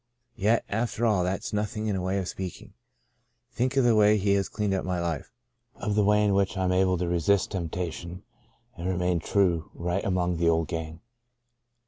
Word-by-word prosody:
Yet 110 Hz, +4 st, +2 dB
after 115 Hz, +2 st, -1 dB
all 105 Hz, -5 st, +3 dB
that's 95 Hz, +4 st, -3 dB
nothing 105 Hz, +1 st, -2 dB
in 105 Hz, -2 st, 0 dB
a 95 Hz, -, -2 dB
way 95 Hz, +2 st, -1 dB
of 95 Hz, -2 st, -2 dB
speaking. 95 Hz, -3 st, -7 dB, 0.8 s
Think 130 Hz, +2 st, -1 dB
of 135 Hz, -, +5 dB
the 120 Hz, -1 st, +4 dB
way 105 Hz, 0 st, +5 dB
He 100 Hz, 0 st, +2 dB
has 100 Hz, -1 st, +1 dB
cleaned 105 Hz, -2 st, -1 dB
up 95 Hz, -, -1 dB
my 90 Hz, -1 st, -2 dB
life! 85 Hz, +1 st, -3 dB, 0.2 s
— 120 Hz, -1 st, -51 dB
of 105 Hz, -, -2 dB
the 105 Hz, 0 st, +3 dB
way 105 Hz, +1 st, +4 dB
in 100 Hz, -, +2 dB
which 100 Hz, 0 st, +1 dB
I 95 Hz, -, 0 dB
am 90 Hz, -, +1 dB
able 90 Hz, 0 st, +2 dB
to 90 Hz, 0 st, -2 dB
resist 90 Hz, +3 st, +1 dB
tempta 90 Hz, -2 st, -3 dB
tion 85 Hz, +2 st, -8 dB, 0.5 s
and 85 Hz, +2 st, -4 dB
remain 90 Hz, -1 st, 0 dB
true 85 Hz, -2 st, +1 dB
right 90 Hz, +3 st, -2 dB
among 90 Hz, -2 st, 0 dB
the 85 Hz, 0 st, +3 dB
old 80 Hz, -1 st, +1 dB
gang. 80 Hz, -1 st, -5 dB
95 Hz, 205 wpm, -27 LUFS, 90-105 Hz, 0.8 s, of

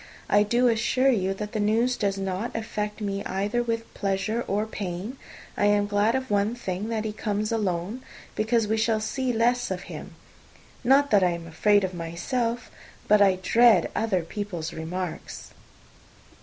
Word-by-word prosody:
I 205 Hz, -, +6 dB
do 235 Hz, +4 st, +3 dB
assure 240 Hz, +3 st, +3 dB
you 195 Hz, -4 st, 0 dB
that 210 Hz, +1 st, -5 dB
the 220 Hz, -, -2 dB
news 225 Hz, +4 st, +2 dB
does 200 Hz, -3 st, -1 dB
not 195 Hz, +4 st, -3 dB
affect 210 Hz, -1 st, -4 dB
me 200 Hz, -1 st, -2 dB
either 205 Hz, +5 st, -1 dB
with 230 Hz, -1 st, -3 dB
pleasure 205 Hz, +4 st, -1 dB
or 205 Hz, +2 st, 0 dB
pain. 205 Hz, +3 st, -5 dB, 0.4 s
I 205 Hz, -, +1 dB
am 205 Hz, 0 st, +3 dB
glad 205 Hz, +3 st, +2 dB
of 260 Hz, -2 st, -3 dB
one 205 Hz, +3 st, +1 dB
thing, 200 Hz, -2 st, -4 dB
that 220 Hz, -1 st, -2 dB
he 215 Hz, -, -3 dB
comes 210 Hz, 0 st, -2 dB
alone; 205 Hz, +1 st, -2 dB, 0.3 s
because 220 Hz, 0 st, +1 dB
we 220 Hz, +1 st, +1 dB
shall 220 Hz, 0 st, +2 dB
see 250 Hz, +4 st, -1 dB
the 230 Hz, -, -3 dB
less 245 Hz, +2 st, +2 dB
of 185 Hz, -1 st, -3 dB
him. -, -, -9 dB, 0.7 s
Not 275 Hz, +3 st, +4 dB
that 200 Hz, -3 st, +5 dB
I 180 Hz, -, +4 dB
am 170 Hz, -1 st, -4 dB
afraid 205 Hz, +5 st, +3 dB
of 185 Hz, -1 st, -2 dB
myself, 230 Hz, +9 st, -3 dB, 0.4 s
but 210 Hz, 0 st, +5 dB
I 195 Hz, -2 st, +5 dB
dread 235 Hz, +3 st, +5 dB
other 195 Hz, -6 st, 0 dB
people's 170 Hz, -3 st, -5 dB
remarks." 170 Hz, +2 st, -5 dB
210 Hz, 170 wpm, -26 LUFS, 195-230 Hz, 0.7 s, I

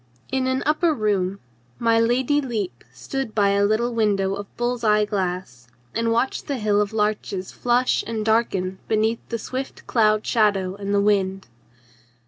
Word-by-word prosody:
In 265 Hz, -1 st, 0 dB
an 260 Hz, +1 st, 0 dB
upper 310 Hz, +2 st, +2 dB
room 200 Hz, -4 st, 0 dB, 0.4 s
my 230 Hz, -1 st, +3 dB
Lady 255 Hz, +5 st, +2 dB
Lepe 210 Hz, -, -4 dB
stood 215 Hz, -, -5 dB
by 200 Hz, -2 st, +3 dB
a 200 Hz, 0 st, +2 dB
little 220 Hz, +4 st, +1 dB
window 200 Hz, -4 st, +1 dB
of 200 Hz, 0 st, -8 dB
bull's 240 Hz, 0 st, -1 dB
eye 210 Hz, -1 st, +4 dB
glass 180 Hz, -, -3 dB, 0.3 s
and 230 Hz, 0 st, 0 dB
watched 235 Hz, +3 st, 0 dB
the 280 Hz, -, -1 dB
hill 210 Hz, -2 st, +2 dB
of 205 Hz, 0 st, -1 dB
larches 210 Hz, -3 st, -1 dB
flush 245 Hz, +1 st, +1 dB
and 220 Hz, -2 st, -3 dB
darken 195 Hz, -4 st, +1 dB
beneath 220 Hz, +1 st, +1 dB
the 230 Hz, -, -2 dB
swift 260 Hz, +4 st, -6 dB
cloud 215 Hz, -2 st, +2 dB
shadow 200 Hz, -5 st, +2 dB
and 200 Hz, 0 st, -5 dB
the 200 Hz, 0 st, +3 dB
wind. 195 Hz, -2 st, +1 dB
215 Hz, 160 wpm, -23 LUFS, 200-235 Hz, 0.4 s, eye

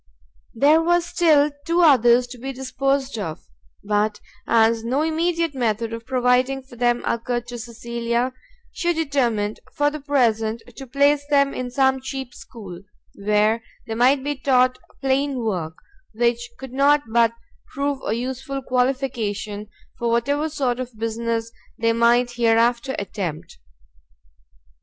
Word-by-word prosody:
There 295 Hz, +7 st, +5 dB
were 345 Hz, +1 st, +3 dB
still 310 Hz, -4 st, +3 dB
two 335 Hz, +3 st, +1 dB
others 250 Hz, -6 st, +5 dB
to 245 Hz, 0 st, -10 dB
be 270 Hz, +3 st, -4 dB
disposed 265 Hz, -1 st, -1 dB
of; 160 Hz, -6 st, -6 dB, 0.4 s
but 210 Hz, +1 st, 0 dB, 0.3 s
as 225 Hz, 0 st, +3 dB
no 260 Hz, +6 st, 0 dB
immediate 330 Hz, 0 st, 0 dB
method 230 Hz, -3 st, -1 dB
of 230 Hz, +1 st, -7 dB
providing 255 Hz, +1 st, +2 dB
for 260 Hz, -1 st, -15 dB
them 240 Hz, 0 st, +1 dB
occurred 240 Hz, +1 st, -1 dB
to 240 Hz, -1 st, -6 dB
Cecilia, 235 Hz, +1 st, -2 dB, 0.4 s
she 345 Hz, 0 st, 0 dB
determined, 245 Hz, -10 st, 0 dB, 0.2 s
for 290 Hz, 0 st, +2 dB
the 305 Hz, -, -6 dB
present, 230 Hz, -6 st, +1 dB
to 270 Hz, -, -8 dB
place 285 Hz, +3 st, +3 dB
them 280 Hz, -1 st, +3 dB
in 255 Hz, -1 st, -4 dB
some 265 Hz, +1 st, +2 dB
cheap 265 Hz, -2 st, -6 dB
school, 195 Hz, -10 st, -10 dB, 0.3 s
where 210 Hz, +2 st, +1 dB, 0.2 s
they 225 Hz, -, -4 dB
might 260 Hz, +4 st, +3 dB
be 290 Hz, +1 st, -1 dB
taught 255 Hz, -2 st, +2 dB, 0.2 s
plain 270 Hz, 0 st, +1 dB
work, 170 Hz, -7 st, -3 dB, 0.4 s
which 240 Hz, +1 st, 0 dB
could 265 Hz, -2 st, -9 dB
not 285 Hz, +2 st, +4 dB
but 230 Hz, 0 st, +3 dB, 0.4 s
prove 280 Hz, 0 st, -2 dB
a -, -, -1 dB
useful 260 Hz, +3 st, -4 dB
qualification 245 Hz, -6 st, -1 dB, 0.3 s
for 235 Hz, -, 0 dB
whatever 285 Hz, +7 st, +1 dB
sort 260 Hz, -5 st, -1 dB
of 250 Hz, -3 st, -6 dB
business 230 Hz, +1 st, -2 dB, 0.3 s
they 230 Hz, -1 st, +2 dB
might 240 Hz, +1 st, +3 dB
hereafter 235 Hz, +2 st, +2 dB
attempt. 175 Hz, -, -5 dB
245 Hz, 140 wpm, -22 LUFS, 230-275 Hz, 0.4 s, There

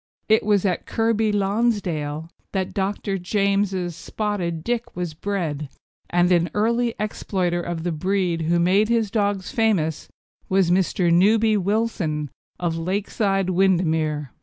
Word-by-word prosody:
It 220 Hz, 0 st, +4 dB
was 205 Hz, -2 st, +2 dB
at 185 Hz, -2 st, -1 dB
Kirkby 225 Hz, -1 st, +1 dB
Lonsdale 195 Hz, -8 st, 0 dB, 0.3 s
that 190 Hz, -2 st, -2 dB
Dr. 195 Hz, 0 st, -2 dB
James's 195 Hz, -2 st, 0 dB
Spotted 175 Hz, -2 st, -3 dB
Dick 240 Hz, +2 st, -2 dB
was 175 Hz, -2 st, -3 dB
bred, 155 Hz, -5 st, -3 dB, 0.4 s
and 175 Hz, +1 st, +2 dB
an 175 Hz, -1 st, +3 dB
early 235 Hz, +2 st, +1 dB
exploiter 185 Hz, -4 st, -1 dB
of 170 Hz, -2 st, -4 dB
the 175 Hz, -, -1 dB
breed 180 Hz, 0 st, 0 dB
who 165 Hz, +2 st, +1 dB
made 190 Hz, +5 st, +3 dB
his 225 Hz, -4 st, +1 dB
dogs 200 Hz, -3 st, 0 dB
famous 200 Hz, -, 0 dB, 0.4 s
was 190 Hz, -2 st, +3 dB
Mr. 180 Hz, -1 st, +2 dB
Newby 215 Hz, +5 st, +4 dB
Wilson, 190 Hz, -, -1 dB, 0.3 s
of 165 Hz, -2 st, -1 dB
Lakeside, 195 Hz, +1 st, 0 dB
Windermere. 160 Hz, -6 st, +1 dB
190 Hz, 130 wpm, -23 LUFS, 170-210 Hz, 0.4 s, It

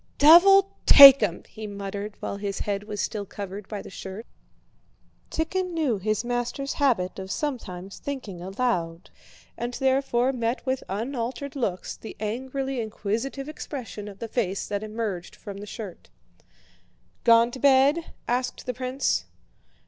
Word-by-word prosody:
"Devil 385 Hz, +6 st, +7 dB, 0.2 s
take 275 Hz, -2 st, +11 dB
'em!" 185 Hz, -5 st, -1 dB
he 215 Hz, -1 st, -8 dB
muttered, 200 Hz, +1 st, -6 dB
while 200 Hz, -, -4 dB
his 200 Hz, -1 st, -4 dB
head 205 Hz, 0 st, -2 dB
was 210 Hz, -1 st, -6 dB
still 210 Hz, +1 st, -2 dB
covered 200 Hz, 0 st, -7 dB
by 210 Hz, -2 st, -6 dB
the -, -, -10 dB
shirt. 195 Hz, +4 st, -8 dB, 1.0 s
Tíkhon 360 Hz, +3 st, -2 dB
knew 290 Hz, -11 st, 0 dB
his 215 Hz, +3 st, -1 dB
master's 245 Hz, +3 st, -2 dB
habit 210 Hz, -11 st, +1 dB
of 190 Hz, 0 st, -7 dB
sometimes 195 Hz, -9 st, -4 dB
thinking 235 Hz, -11 st, -6 dB
aloud, 180 Hz, -4 st, -2 dB, 0.4 s
and 240 Hz, +1 st, -4 dB
therefore 265 Hz, -1 st, +1 dB
met 235 Hz, +1 st, -2 dB
with 260 Hz, 0 st, -1 dB
unaltered 240 Hz, +6 st, -4 dB
looks 200 Hz, -9 st, -3 dB
the 220 Hz, -, -9 dB
angrily 260 Hz, +4 st, -3 dB
inquisitive 225 Hz, +6 st, -3 dB
expression 255 Hz, -8 st, -7 dB
of 200 Hz, -2 st, -9 dB
the 230 Hz, -, -6 dB
face 200 Hz, -5 st, -2 dB
that 205 Hz, -1 st, -2 dB
emerged 215 Hz, -5 st, -4 dB
from 200 Hz, -1 st, -9 dB
the 205 Hz, +1 st, -8 dB
shirt. 205 Hz, -4 st, -9 dB, 1.1 s
"Gone 230 Hz, 0 st, +5 dB
to 260 Hz, -, -8 dB
bed?" 280 Hz, +4 st, +4 dB, 0.2 s
asked 250 Hz, +1 st, -2 dB
the 250 Hz, -, -2 dB
prince. 255 Hz, -, -1 dB
230 Hz, 140 wpm, -25 LUFS, 200-270 Hz, 1.1 s, take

